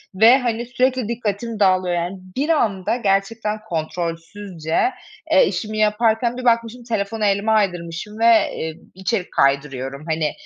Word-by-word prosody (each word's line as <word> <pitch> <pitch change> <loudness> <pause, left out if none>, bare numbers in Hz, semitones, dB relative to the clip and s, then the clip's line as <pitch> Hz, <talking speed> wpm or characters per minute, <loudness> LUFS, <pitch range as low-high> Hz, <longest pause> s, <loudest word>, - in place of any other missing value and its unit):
ve, 230 +6 +7
hani, 240 -2 -2
sürekli 255 -1 0
dikkatim 225 -1 -3
dağılıyor 185 -2 +3
yani. 175 +3 -3 0.2
Bir 290 +5 -1
anda 220 - +1
gerçekten 210 0 0
kontrolsüzce, 165 +1 -3 0.5
eee, - - +6
işimi 215 -1 -3
yaparken 225 +3 +2
bir 255 - -5
bakmışım 235 +1 +1
telefonu 220 -1 -2
elime 200 +2 +1
aydırmışım 190 0 -1
ve, 230 - +2 0.3
eee, 160 0 -4 0.2
içerik 190 +1 -2
kaydırıyorum. 140 0 0
Hani, 155 -2 0
210 Hz, 130 wpm, -21 LUFS, 175-230 Hz, 0.5 s, ve